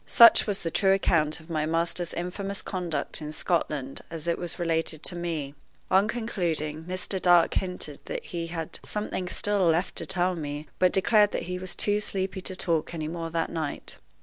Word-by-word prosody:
Such 230 Hz, -1 st, +8 dB
was 205 Hz, -1 st, -2 dB
the 165 Hz, -, -1 dB
true 195 Hz, +1 st, +4 dB
account 165 Hz, -5 st, +2 dB
of 160 Hz, -, -16 dB
my 155 Hz, -1 st, 0 dB
master's 170 Hz, +1 st, 0 dB
infamous 195 Hz, +3 st, -4 dB
conduct 170 Hz, -6 st, -3 dB
in 150 Hz, 0 st, -5 dB
Scotland 150 Hz, -4 st, -1 dB
as 165 Hz, -1 st, -6 dB
it 170 Hz, -, +1 dB
was 175 Hz, -2 st, -1 dB
related 165 Hz, -2 st, -1 dB
to 175 Hz, -, -3 dB
me. 165 Hz, -5 st, -3 dB, 0.4 s
On 190 Hz, +2 st, +5 dB
concluding, 165 Hz, -9 st, -2 dB
Mr. 185 Hz, +1 st, -3 dB
Dark 175 Hz, -2 st, +5 dB
hinted 180 Hz, -1 st, -3 dB
that -, -, -5 dB
he 170 Hz, -2 st, -4 dB
had 165 Hz, -1 st, -5 dB
something 210 Hz, -3 st, -3 dB
still 200 Hz, 0 st, +1 dB
left 165 Hz, +3 st, +2 dB
to -, -, -2 dB
tell 185 Hz, -1 st, +2 dB
me, 150 Hz, -2 st, -4 dB
but 185 Hz, -1 st, +5 dB
declared 210 Hz, +1 st, +4 dB
that -, -, -1 dB
he 180 Hz, +1 st, -4 dB
was 185 Hz, 0 st, -5 dB
too 205 Hz, 0 st, +2 dB
sleepy 190 Hz, -2 st, -2 dB
to 185 Hz, 0 st, -2 dB
talk 170 Hz, -2 st, 0 dB
any 155 Hz, -2 st, -3 dB
more 165 Hz, 0 st, -4 dB
that 165 Hz, 0 st, -1 dB
night. 155 Hz, -3 st, -3 dB
175 Hz, 190 wpm, -27 LUFS, 160-190 Hz, 0.4 s, Such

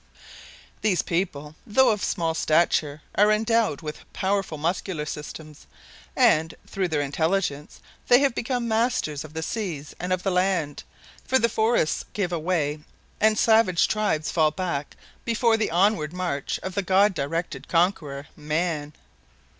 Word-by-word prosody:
These 200 Hz, -5 st, +2 dB
people, 155 Hz, -4 st, -2 dB
though 225 Hz, +1 st, +4 dB
small 170 Hz, -4 st, -1 dB
of 160 Hz, -, -5 dB
stature, 155 Hz, -2 st, +1 dB
are 210 Hz, +1 st, +4 dB
endowed 220 Hz, -7 st, +1 dB
with 150 Hz, -1 st, -6 dB
powerful 190 Hz, -4 st, -1 dB
muscular 165 Hz, 0 st, -2 dB
systems 150 Hz, 0 st, -8 dB, 0.5 s
and, 165 Hz, -, +3 dB
through 190 Hz, -2 st, -2 dB
their 155 Hz, -3 st, 0 dB
intelligence, 150 Hz, +1 st, -1 dB, 0.3 s
they 245 Hz, -, +7 dB
have 275 Hz, -3 st, +2 dB
become 245 Hz, 0 st, -2 dB
masters 225 Hz, -, 0 dB
of 155 Hz, 0 st, -12 dB
the 160 Hz, -, -3 dB
seas 165 Hz, -8 st, -4 dB
and 180 Hz, +1 st, -4 dB
of 185 Hz, 0 st, 0 dB
the 195 Hz, -, 0 dB
land, 180 Hz, -5 st, 0 dB, 0.4 s
for 260 Hz, -, +2 dB
the 235 Hz, -, +3 dB
forests 220 Hz, -8 st, +1 dB
give 185 Hz, -4 st, -1 dB
away 155 Hz, -3 st, -1 dB, 0.4 s
and 215 Hz, 0 st, +3 dB
savage 220 Hz, -7 st, +4 dB
tribes 210 Hz, -8 st, 0 dB
fall 155 Hz, -2 st, +3 dB
back 155 Hz, -4 st, -4 dB, 0.3 s
before 230 Hz, 0 st, +2 dB
the 220 Hz, -1 st, 0 dB
onward 175 Hz, -2 st, +2 dB
march 175 Hz, -6 st, -2 dB
of 190 Hz, -, -4 dB
the 200 Hz, -, 0 dB
God 195 Hz, +2 st, +3 dB
directed 165 Hz, +3 st, -3 dB
conqueror, 165 Hz, -5 st, 0 dB
man. 155 Hz, 0 st, -2 dB
180 Hz, 145 wpm, -25 LUFS, 155-210 Hz, 0.5 s, they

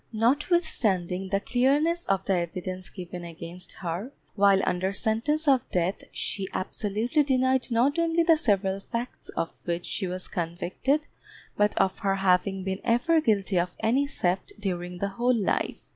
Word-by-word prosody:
Notwithstanding 225 Hz, -, +1 dB
the 195 Hz, +1 st, +1 dB
clearness 290 Hz, +10 st, +2 dB
of 195 Hz, -1 st, +1 dB
the 195 Hz, -, +2 dB
evidence 185 Hz, +1 st, -3 dB
given 180 Hz, -2 st, -7 dB
against 170 Hz, +1 st, -7 dB
her, 180 Hz, +8 st, -4 dB, 0.2 s
while 200 Hz, -1 st, +5 dB
under 185 Hz, +2 st, 0 dB
sentence 245 Hz, +10 st, 0 dB
of 265 Hz, -3 st, +3 dB
death 180 Hz, +2 st, -1 dB
she 195 Hz, -2 st, -3 dB
absolutely 220 Hz, +9 st, 0 dB
denied 260 Hz, -2 st, +2 dB
not 255 Hz, +7 st, +2 dB
only 335 Hz, 0 st, +2 dB
the 330 Hz, -1 st, +6 dB
several 195 Hz, -, +1 dB
facts 235 Hz, +5 st, -6 dB
of 165 Hz, -, -1 dB
which 175 Hz, 0 st, -1 dB
she 190 Hz, -, -2 dB
was 185 Hz, +1 st, -4 dB
convicted, 180 Hz, -, -1 dB, 0.5 s
but 210 Hz, 0 st, +2 dB
of 190 Hz, -, +2 dB
her 195 Hz, -1 st, +1 dB
having 195 Hz, 0 st, +2 dB
been 190 Hz, +1 st, -3 dB
ever 245 Hz, +8 st, +3 dB
guilty 200 Hz, -, +2 dB
of 175 Hz, +1 st, -2 dB
any 255 Hz, +6 st, +2 dB
theft 185 Hz, -9 st, -1 dB
during 180 Hz, -3 st, -3 dB
the 200 Hz, +2 st, -1 dB
whole 240 Hz, +5 st, +1 dB
life. 205 Hz, -, -1 dB
200 Hz, 155 wpm, -27 LUFS, 185-255 Hz, 0.5 s, the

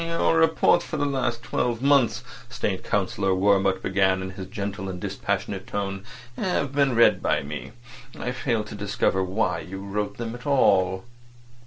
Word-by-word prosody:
"Your 165 Hz, 0 st, +1 dB
reports 165 Hz, 0 st, +4 dB
for 155 Hz, -, -5 dB
the 145 Hz, -, 0 dB
last 125 Hz, -4 st, -1 dB
twelve 120 Hz, +1 st, -1 dB
months," 140 Hz, -4 st, +3 dB, 0.3 s
State -, -, -2 dB
Councillor 95 Hz, -1 st, 0 dB
Wurmt 95 Hz, 0 st, +2 dB
began 95 Hz, 0 st, +2 dB
in 95 Hz, -, -5 dB
his 95 Hz, -1 st, -8 dB
gentle 100 Hz, 0 st, -4 dB
and 90 Hz, -1 st, -5 dB
dispassionate 100 Hz, 0 st, -3 dB
tone, 100 Hz, -1 st, -3 dB, 0.3 s
"have 145 Hz, -7 st, -1 dB
been 140 Hz, -3 st, +2 dB
read 115 Hz, -, +5 dB
by -, -, +1 dB
me. 75 Hz, +1 st, -7 dB, 0.5 s
I 125 Hz, -, -2 dB
failed 120 Hz, -4 st, -1 dB
to -, -, -7 dB
discover 100 Hz, -2 st, 0 dB
why 95 Hz, -2 st, 0 dB
you 95 Hz, +3 st, -7 dB
wrote 100 Hz, +1 st, -3 dB
them 115 Hz, -1 st, -4 dB
at 120 Hz, +3 st, -9 dB
all." 95 Hz, -9 st, +3 dB
100 Hz, 165 wpm, -25 LUFS, 95-125 Hz, 0.5 s, read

